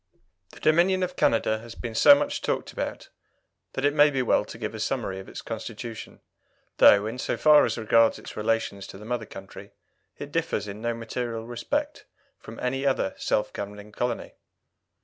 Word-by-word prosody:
The - - -13
Dominion 180 +4 +3
of 180 0 -3
Canada 110 -1 +2
has 115 +1 -11
been 120 -2 -6
so 285 - +8
much 290 0 -2
talked - - -2
about - - -5 0.6
that 135 - -1
it 145 - +3
may 150 0 +6
be 135 -3 0
well 115 - +3
to 110 - -10
give 110 -1 -4
a 110 - -7
summary 105 -5 -2
of 95 - -10
its - - -8
Constitution, 115 0 -7 0.6
though, 100 0 +7
in 115 +4 -5
so - - -2
far 150 -1 +6
as - - -2
regards 115 0 +3
its - - -10
relations 105 -2 -1
to - - -10
the 105 - -11
mother 115 -2 -3
country, 95 0 -11 0.4
it - - -8
differs 105 - -1
in 100 +1 -7
no 120 0 -1
material 115 0 -4
respect 290 - -3 0.3
from - - -11
any 135 +2 -1
other 135 -8 +1
self 105 - -1
governing 105 +1 -7
colony. 120 +2 -3
115 Hz, 185 wpm, -26 LUFS, 110-135 Hz, 0.6 s, so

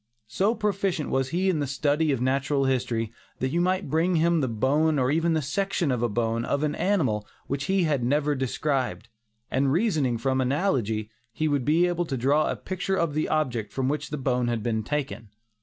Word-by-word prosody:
So 195 - +1
proficient 200 -7 -1
was 130 -1 +1
he 180 +6 0
in 180 -5 +2
the 145 - -1
study 145 +3 +1
of 135 - 0
natural 135 +2 +1
history, 120 -4 -1 0.2
that 130 - -1
you 170 - +1
might 185 +1 0
bring 170 +3 +2
to - - +3
him 170 0 +3
the 130 - +1
bone 145 +7 +1
or 130 0 +2
even 165 +1 +2
a 155 - -1
section 175 +1 0
of 125 -2 -1
a 120 - +1
bone 115 +1 0
of 140 +4 -1
an 150 -1 0
animal 150 - 0 0.2
which 140 +1 -3
he 190 +1 +2
had 145 -6 +1
never 145 +4 +1
seen 135 - -4
described, 130 - -1 0.4
and 135 +1 +2
reasoning 155 - +1
from 130 +3 0
analogy, 125 - 0 0.2
he 155 +6 -1
would 145 -4 0
be 160 +4 +4
able 175 0 0
to 135 -5 -3
draw 140 +5 +2
a - - -1
picture 190 +1 -3
of 170 -5 0
the 155 +1 -1
object 125 -9 -1
from 130 -1 -1
which 150 +1 -2
the 150 - -3
bone 125 -2 0
had 115 -3 -1
been 110 -1 0
taken. 135 -3 -4
145 Hz, 215 wpm, -26 LUFS, 125-165 Hz, 0.4 s, be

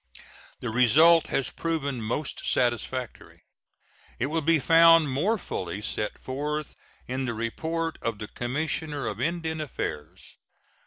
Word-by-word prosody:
The 120 - -3
result 155 +8 +5
has 135 - -1
proven 140 -7 -2
most 120 +7 -3
satisfactory. 125 0 -2 0.7
It 125 - 0
will 165 0 0
De 165 +2 +3
found 165 0 +6
more 185 +13 +1
fully 95 - -5
set 105 0 -3
forth 150 +3 -4 0.3
in 130 +1 -3
the 120 -2 -3
report 160 +9 -3
of 115 -2 -2
the 105 0 -6
Commissioner 145 +4 -3
of 105 +1 -4
Indian 160 +1 -2
Affairs. 85 - -6
140 Hz, 125 wpm, -27 LUFS, 120-160 Hz, 0.7 s, found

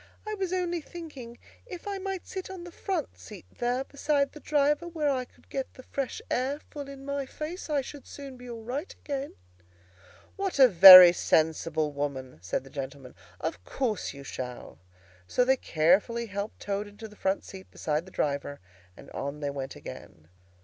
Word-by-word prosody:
"I 430 - -2
was 385 -4 -2
only 350 -2 -1
thinking, 290 -8 -9 0.3
if 365 -2 -8
I 400 -1 -3
might 385 -1 -4
sit 375 -1 -6
on 375 -2 -7
the 350 - -9
front 360 -3 -3
seat 205 -5 -11
there, 245 +2 0
beside 280 0 0
the 300 - -11
driver, 295 +3 +1
where 310 -4 0
I 255 -2 -1
could - - -26
get 270 -1 -5
the 255 - -12
fresh 275 -1 -4
air 265 +4 0
full 285 -2 -6
in 275 0 -10
my 280 -1 -3
face, 315 +6 -6
I 290 -2 +2
should 280 +1 -10
soon 275 -2 -9
be 250 0 -11
all 230 -1 -7
right 270 +9 -4
again." 280 -1 -5 1.0
"What 390 -4 -2
a 265 -2 +9
very 185 -3 +12
sensible 160 -2 +1
woman!" 140 - -4
said 90 +7 -2
the 135 - -14
gentleman. 135 -2 -7 0.3
"Of 90 - -4
course 225 - -2
you 140 -1 -10
shall." 125 - -7 0.5
So 250 - +2
they 265 +1 +5
carefully 200 +5 +2
helped 200 0 -5
Toad 205 +1 -2
into 205 +2 -10
the 210 - -16
front 190 -1 -1
seat 190 -1 -11
beside 155 +3 -2
the - - -12
driver, 145 -2 -2 0.4
and - - -13
on 140 +2 -4
they 145 -1 -2
went 135 -1 -5
again. 80 0 -11
245 Hz, 185 wpm, -28 LUFS, -, 1.0 s, very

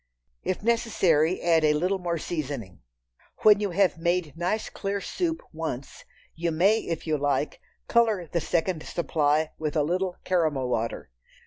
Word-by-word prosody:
If 185 - -2
necessary, 190 -8 +2
add 165 -2 +4
a 150 -1 +4
little 185 +5 0
more 170 -2 -1
seasoning. 135 - -5 0.6
When 210 -1 +7
you 205 -1 -1
have 180 -2 +2
made 170 -3 0
nice 180 +6 -1
clear 200 0 -3
soup 330 - -2
once, 155 -5 -5 0.3
you 170 +1 -2
may, 195 +8 +4
if 165 -6 -4
you 155 -2 0
like, 145 +1 -1 0.3
color 220 -6 +3
the 170 +1 -2
second 170 0 0
supply 155 -2 0
with 155 -2 -2
a 150 - +3
little 180 +3 -1
"caramel 155 -8 +1
water." 115 - -2
170 Hz, 150 wpm, -26 LUFS, 150-190 Hz, 0.6 s, When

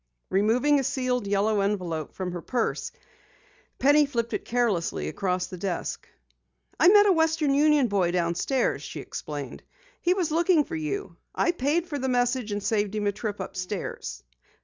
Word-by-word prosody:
Removing 240 +9 +3
a - - -1
sealed 255 -4 -1
yellow 205 +1 +1
envelope 180 -6 -2
from 185 -1 -3
her 175 -1 -5
purse, 240 +3 -2 0.9
Penny 290 +2 +5
flipped 235 -4 -2
it - - -2
carelessly 205 - 0
across 180 - -1
the 180 - -9
desk. 185 -2 -4 0.7
"I 320 - +6
met 410 +2 +8
a 405 - +5
Western 320 -4 +2
Union 295 -2 +4
boy 195 -5 +1
downstairs," 175 +9 0
she - - -7
explained. - - -6 0.4
"He 360 +1 +2
was 350 -5 -1
looking 330 0 +3
for 335 +3 -6
you. 395 +6 -4 0.2
I 345 - +2
paid 325 +2 0
for 295 -5 -4
the 265 0 -1
message 245 -2 0
and 205 -1 -3
saved 210 -1 0
him 210 -1 -1
a 205 - +2
trip 205 0 -5
upstairs. 185 - -5
245 Hz, 165 wpm, -26 LUFS, 200-300 Hz, 0.9 s, met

